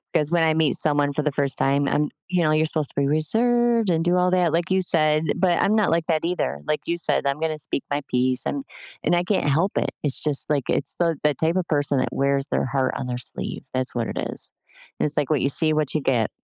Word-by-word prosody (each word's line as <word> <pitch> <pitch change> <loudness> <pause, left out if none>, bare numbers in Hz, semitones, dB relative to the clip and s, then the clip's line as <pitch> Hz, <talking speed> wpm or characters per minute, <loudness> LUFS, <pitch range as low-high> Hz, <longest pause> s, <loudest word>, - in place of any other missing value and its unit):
'cause 150 +1 +1
when 170 - +2
I 160 -1 +3
meet 155 -5 +2
someone 145 -1 +2
for 150 - -1
the 150 -1 -1
first 140 -1 -1
time, 140 +1 +1
I'm, 150 0 0 0.2
you 180 -1 0
know, 155 - +2
you're 155 +1 +2
supposed 155 -2 -2
to - - -4
be 140 - +2
reserved 230 - +2
and 165 -1 +1
do 175 +1 +2
all 180 0 +2
that 180 -3 +2
like 175 +3 -1
you 190 0 +3
said, 155 -3 +2
but 175 -1 +2
I'm 210 - +2
not 215 -5 +2
like 165 0 +1
that 160 -2 0
either. 75 - -2
Like 150 - 0
you 170 - -1
said, 170 - 0
I'm 140 +2 -1
gonna 155 -1 -2
speak 140 - 0
my 145 +1 -1
peace 125 0 +1
and 280 - -3 0.4
and 175 - +2
I 175 - +1
can't 190 -4 0
help 165 +8 +1
it. - - 0
It's 140 -3 -1
just, 150 -1 0
like, 145 -4 -1
it's 140 - 0
the 165 -3 +1
the 150 -1 +3
type 160 +5 0
of 185 -2 -1
person 145 -3 +1
that - - 0
wears 140 +1 0
their - - -1
heart 130 0 -1
on 130 - -4
their 125 -1 -3
sleeve. - - -5
That's 130 0 -1
what 115 -2 -1
it - - -6
is. - - -6 0.5
And - - +1
it's, 150 - 0
like, 145 -1 0
"What 150 -4 +1
you 140 - +1
see, 155 +2 +3
what 155 -2 0
you 155 - +1
get." 120 -5 +1
155 Hz, 265 wpm, -23 LUFS, 140-175 Hz, 0.5 s, I